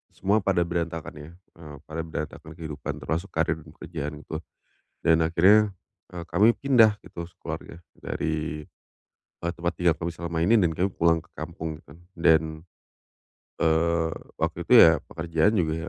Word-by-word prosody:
semua 100 +3 +2
pada 95 -3 +1
berantakan 85 -1 -3
ya, 75 +1 -10
eee, 85 -4 -14
pada 80 +1 -7
berantakan 80 0 -6
kehidupan 80 -4 -6
termasuk 85 +4 -2
karier 80 -2 -1
pekerjaanku. 75 0 -7 0.6
Dan 80 0 +4
akhirnya, 100 +5 +4 0.4
eee, 85 - -5
kami 105 +7 +5
pindah 115 -6 +4
gitu 85 -1 -8
sekeluarga 85 0 -8 0.2
dari, 80 0 -3 0.8
e - - -12
tempat 85 +1 -1
tinggal 85 -2 +3
kami 85 0 -3
selama 85 0 -5
ini, 110 +6 +5
dan 90 -5 +3
kami 95 +4 0
pulang 85 0 +3
ke 85 - -27
kampung 80 -1 -6
gitu 70 - -17
kan. - - -17 0.2
Dan, 80 -1 +5 1.2
eee, 80 +1 +2 0.3
waktu - - -2
itu - - 0
ya - - +8
pekerjaan 80 +4 0
juga 80 -6 +1
85 Hz, 145 wpm, -26 LUFS, 80-90 Hz, 1.2 s, ya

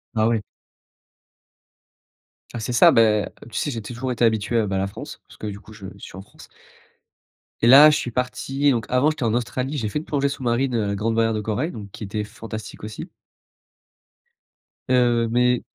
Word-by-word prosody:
Ah 110 0 +3
oui. 115 -2 +1 2.1
Ah 120 - -4
c'est 115 +3 -3
ça, 120 - +7
bah, 110 -2 +3 0.2
tu - - -6
sais 145 - -1
j'ai 115 -3 -5
toujours 125 +4 -5
été 120 0 +2
habitué, 110 +1 +1
heu, 110 -3 +1
bah, 95 - -2
à - - 0
la 95 - 0
France 100 - -9
parce - - -17
que 110 - -6
du 100 -1 -6
coup - - -16
je 105 -2 -11
je - - -16
suis 95 - -10
en - - -7
France 95 - -16 1.2
et 115 - +5
là 140 +4 +10
je 150 - +2
suis - - -3
parti, 130 +3 0
donc 115 -4 -1
avant 125 +4 +3
j'étais 155 - -9
en 115 -2 +1
Australie 130 +4 -2
j'ai 115 -5 -2
fait 150 - -2
une 160 - -10
plongée 140 -1 0
sous-marine, 130 -1 -1
heu, 100 -3 0
grande 110 +3 -1
barrière 115 0 +2
de 105 - -2
corail 110 - -2
donc 100 - -9
qui - - -9
était 105 +1 -3
fantastique 110 0 -9
aussi 110 0 -7 1.8
heu, 120 -2 +3
mais 125 +1 +2
115 Hz, 200 wpm, -22 LUFS, 110-125 Hz, 2.1 s, là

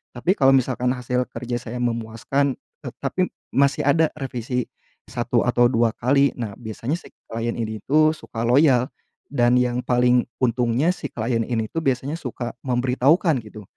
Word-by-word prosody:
Tapi 170 +10 +1
kalau 135 -1 +6
misalkan 125 -1 0
hasil 125 0 -1
kerja 120 +1 -4
saya 120 0 -7
memuaskan, 120 +4 -1 0.3
eee, - - -4
tapi - - 0 0.3
masih 140 +1 +2
ada 160 +2 +4
revisi 125 -3 -3 0.4
1 - - 0
atau 120 0 +4
2 115 -1 +2
kali, 140 +3 +3
nah 110 -4 -3
biasanya 115 +5 -4
si - - -15 0.2
klien 115 +1 -2
ini 110 -1 -3
tuh 155 +2 +4
suka 115 - -9
loyal 130 -1 +4 0.4
dan 120 -3 +3
yang 125 0 0
paling 125 0 +3 0.2
untungnya 125 +5 +2
si - - -5
klien 115 0 -1
ini 115 -3 -1
itu 165 - -2
biasanya 135 +2 0
suka 125 -4 -5
memberitahukan 130 +6 +2
gitu, 105 0 -11
125 Hz, 155 wpm, -23 LUFS, 120-135 Hz, 0.4 s, kalau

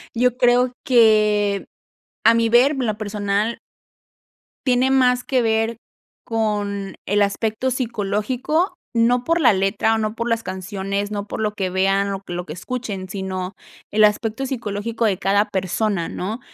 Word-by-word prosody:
Yo 250 +1 +2
creo 245 0 +3
que 210 -4 +3 0.6
a 230 - +7
mi 230 0 +2
ver 245 +5 +5
en 260 -4 -2
lo 215 -1 -1
personal 205 +1 -1 1.1
tiene 255 +1 +3
más 250 -2 +3
que 260 -2 +1
ver 225 0 0 0.5
con 205 -3 -2
el 205 +1 +2
aspecto 220 +5 -1
psicológico, 245 - -1 0.2
no 240 +1 +3
por 330 +4 +1
la 240 -6 +6
letra 195 +3 +1
o - - 0
no 215 -1 -1
por 235 +1 -3
las 230 0 0
canciones, 195 +2 -3
no 205 -1 -3
por - - -5
lo 210 -1 0
que 195 -3 -2
vean, 195 +1 +1
lo 195 - -3
que 180 - -8
lo 175 0 -4
que 155 - -7
escuchen, 200 -1 -5
sino 190 -1 -4 0.4
el 215 +1 +4
aspecto 220 +4 +1
psicológico 230 -2 -3
de 200 -4 +1
cada 200 +3 +2
persona, 190 -1 -1
¿no? 210 +6 -4
215 Hz, 160 wpm, -21 LUFS, 200-240 Hz, 1.1 s, a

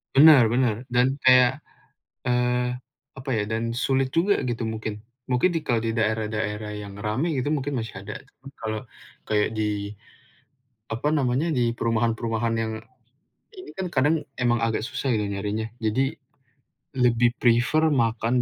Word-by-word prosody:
Benar 145 -2 +9
benar 120 -3 +2 0.2
dan 125 +2 +3
kayak, 125 +2 +5 0.6
eee, 125 0 +1 0.4
apa 135 +1 -8
ya, 105 - +1
dan 115 +2 -2
sulit 135 0 +1
juga 180 +8 +2
gitu 120 -2 -2
mungkin. 110 -1 -4 0.3
Mungkin 125 +8 +3
di 165 - -1
kalau 120 -6 0
di 115 - 0
daerah-daerah 110 -1 -1
yang 100 -1 -9
ramai 130 +10 -1
gitu 145 +4 0
mungkin 145 -2 -2
masih 110 -4 -5
ada, 105 +1 -7
cuman 135 0 -15
kalau 110 -1 -3 0.5
kayak 105 +1 +1
di, 105 -1 -2 1.0
apa 130 +6 -1
namanya, 140 +1 +1
di 120 -6 +1
perumahan-perumahan 115 0 0
yang 110 0 -2 0.8
ini 375 +1 -10
kan 190 -1 -3
kadang 150 +1 +2 0.2
emang 120 -1 +1
agak 115 -1 0
susah 130 +2 -3
ya 105 - -1
nyarinya, 105 +2 -3 0.2
jadi 130 +6 +1 0.8
lebih 120 -1 +4
prefer 125 +7 +3
makan 115 -1 +1
120 Hz, 145 wpm, -25 LUFS, 110-130 Hz, 1.0 s, Benar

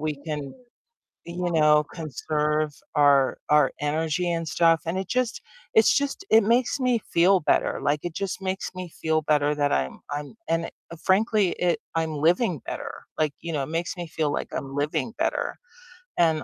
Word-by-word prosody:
we 155 -1 -2
can, 150 -4 -5 0.7
you 175 +1 -3
know, 150 -1 +5
conserve 150 -1 -1 0.2
our 140 -2 +4
our 150 -2 +5
energy 155 +3 0
and 165 0 -2
stuff, 165 0 +3
and 165 +3 -2
it 190 -1 -3
just 250 0 -1 0.3
it's 220 - +5
just, 285 +7 -2
it 225 -1 +6
makes 240 +5 +2
me 250 -3 +2
feel 185 0 +3
better, - - +1
like, 145 +1 +1
it 175 - -4
just 195 +2 -3
makes 190 0 -3
me 185 -1 -6
feel 160 0 +1
better 150 -1 +2
that 145 -1 +1
I'm 65 -1 -1
I'm 145 +5 -5
and 165 0 0 0.3
frankly 205 -1 +3
it 175 -1 +1 0.2
I'm 160 -2 -1
living 170 - +2
better, - - -6
like, 150 -2 +1
you 170 -1 -5
know, 145 -3 0
it - - -5
makes 165 +4 -2
me 175 -1 -5
feel 155 -1 -1
like - - -3
I'm 135 0 -5
living 150 +10 -1
better, - - -1 0.6
and 160 -4 +3
160 Hz, 175 wpm, -25 LUFS, 150-185 Hz, 0.7 s, it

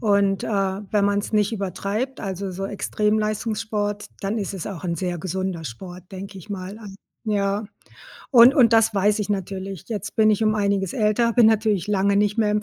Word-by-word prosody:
und, 200 -3 +2
äh, - - -4
wenn 200 0 0
man's 205 +1 0
nicht 210 0 +2
übertreibt, 205 +5 -3
also 190 -1 -4
so 195 +2 -4
Extremleistungssport, 210 0 -1
dann 200 +3 -2
ist 200 -1 -3
es 190 - -5
auch 185 -3 -7
'n 170 -1 -1
sehr 175 +1 -3
gesunder 185 -1 -3
Sport, 180 - -9
denke 195 +1 -8
ich 185 - -13
mal 195 +1 -6
an 205 -3 -10 0.3
ja, 200 0 0 0.7
und 245 +1 +8
und 245 -5 +5
das 225 -1 +4
weiß 205 +2 +2
ich 210 - -3
natürlich. 195 -1 -4
Jetzt 205 -2 -5
bin 215 -1 +5
ich 215 +1 +1
um 215 - +3
einiges 200 -3 0
älter, 230 0 +2
bin 235 -1 +5
natürlich 215 -4 +2
lange 200 0 +2
nicht 205 +2 +1
mehr 215 -2 +3
im 210 0 0
205 Hz, 190 wpm, -23 LUFS, 195-215 Hz, 0.7 s, und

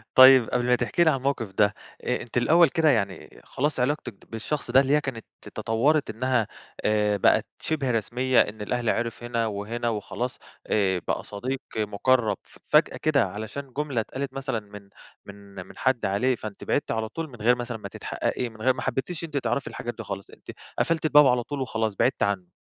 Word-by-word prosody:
طيّب 130 -2 +9
قبل 125 0 0
ما 125 0 +4
تحكي 125 +8 +1
لي 160 - +5
عن 135 -4 0
موقف 130 -7 -1
ده، 100 +1 +3 0.3
أ - - -1
أنتِ 120 - -5
الأوّل 165 +7 +5
كده 160 +2 +3
يعني 100 -8 -1
خلاص 145 0 -2
علاقتِك 125 -1 -1 0.2
بالشخص 120 +4 -3
ده 130 +2 +7
اللي 135 +1 +1
هي 150 - +3
كانت 125 -6 -5 0.2
تطورت 140 +7 0
إنّها 120 0 0 0.4
آآ 105 -1 +2
بقت - - +3 0.2
شِبه 145 -5 -1
رسميّة، 125 +3 +1
إن 105 +1 -3
الأهل 120 +2 -1
عرف 115 0 -2
هنا 120 -1 -1
وهنا 110 +3 -3
وخلاص، 115 +3 -4 0.3
آآ 95 -3 +2
بقى - - -1
صديق 130 +6 -4 0.2
مُقرب 110 +3 +1 0.3
فجأة - - +4
كده، 145 -4 +2
علشان 115 +6 -6
جملة 145 -6 0
اتقالت 130 +4 -5
مثلًا 135 -3 -2
من 105 -1 -13 0.4
من 100 0 -13
من - - -15
حد 130 -2 +1
عليه، 105 +7 +1
فأنتِ 110 -3 -8
بعدتِ 145 - -1
على 110 -1 -2
طول 165 +4 -5
من 125 - -12
غير 120 +3 +5
مثلًا 120 -1 -5
ما 105 - -7
تتحققي؟ 125 - -3
من 110 -1 -14
غير 130 +3 +4
ما 125 - -6
حبيتيش 135 +7 -3
أنتِ 155 -3 -4
تعرفي 125 +1 -1
الحاجات 120 0 -5
دي 115 - -6
خالص؟ 100 -1 -6
أنتِ - - -11 0.3
قفلتِ 165 -1 +1
الباب 150 -2 +7
على 125 -1 +2
طول 145 +2 -5
وخلاص 110 -5 -1
بعدتِ 125 +6 +1
عنّه؟ 100 -3 -1
120 Hz, 195 wpm, -26 LUFS, 110-135 Hz, 0.4 s, طيّب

